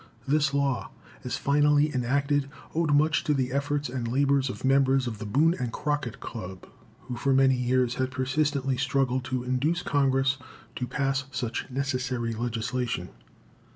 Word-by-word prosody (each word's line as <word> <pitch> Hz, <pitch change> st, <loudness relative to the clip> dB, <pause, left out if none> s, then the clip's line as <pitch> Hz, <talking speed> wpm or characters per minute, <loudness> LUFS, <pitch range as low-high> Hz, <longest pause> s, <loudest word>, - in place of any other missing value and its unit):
This 150 Hz, 0 st, +2 dB
law, 140 Hz, -2 st, 0 dB, 0.3 s
as 125 Hz, +2 st, -2 dB
finally 145 Hz, +1 st, +3 dB
enacted, 140 Hz, +3 st, +1 dB, 0.2 s
owed 160 Hz, -1 st, +1 dB
much 150 Hz, +1 st, +3 dB
to 150 Hz, -, +2 dB
the 130 Hz, -2 st, 0 dB
efforts 145 Hz, +1 st, -1 dB
and 125 Hz, -1 st, -3 dB
labor 140 Hz, +3 st, +3 dB
of 130 Hz, -1 st, -3 dB
members 135 Hz, -1 st, +3 dB
of 110 Hz, -4 st, -4 dB
the 105 Hz, -, -5 dB
Boone 150 Hz, +10 st, +3 dB
and 125 Hz, -2 st, -2 dB
Crockett 145 Hz, -3 st, -2 dB
Club, 95 Hz, -4 st, -7 dB, 0.4 s
who 125 Hz, -, -6 dB
for 135 Hz, +2 st, +1 dB
many 135 Hz, 0 st, +5 dB
years 125 Hz, -1 st, +1 dB
had 130 Hz, 0 st, -1 dB
persistently 135 Hz, 0 st, 0 dB
struggled 130 Hz, -1 st, +1 dB
to 130 Hz, -1 st, -2 dB
induce 140 Hz, +8 st, 0 dB
Congress 135 Hz, -5 st, +2 dB, 0.4 s
to 125 Hz, -, -2 dB
pass 135 Hz, +1 st, -1 dB
such 125 Hz, -1 st, -3 dB
necessary 130 Hz, -3 st, -2 dB
legislation. 115 Hz, -3 st, -2 dB
135 Hz, 155 wpm, -27 LUFS, 125-140 Hz, 0.4 s, many